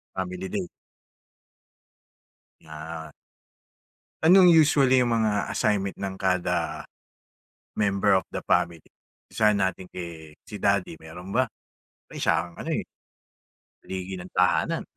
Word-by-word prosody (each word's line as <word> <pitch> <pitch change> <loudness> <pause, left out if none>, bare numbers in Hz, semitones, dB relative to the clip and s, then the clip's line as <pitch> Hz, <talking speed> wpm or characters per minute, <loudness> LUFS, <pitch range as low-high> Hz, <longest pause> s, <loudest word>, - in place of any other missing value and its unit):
Family 95 0 -4
day. 95 -1 -3 1.9
Yeah. 80 +1 -8 1.1
Anong 180 +2 +7
usually 140 -5 +5
'yong 120 -2 +2
mga 105 -2 0
assignment 100 -2 0
ng 95 -1 -4
kada, 95 -2 -1 0.9
member 100 -1 +2
of 95 - +2
the - - -3
family? 85 -1 +2 0.5
Umpisahan 105 -2 +2
natin 95 -1 -1
kay 85 -3 -8 0.2
si 105 - -8
daddy 100 -4 +1
meron 90 +5 -9
ba? 130 - +4 0.7
Eh, - - -11
siya 85 +1 +1
ang - - -17
ano, - - -4
eh, - - -2 0.9
haligi 95 0 -6
ng 90 - -8
tahanan. 90 0 +2
95 Hz, 115 wpm, -26 LUFS, 90-105 Hz, 1.9 s, Anong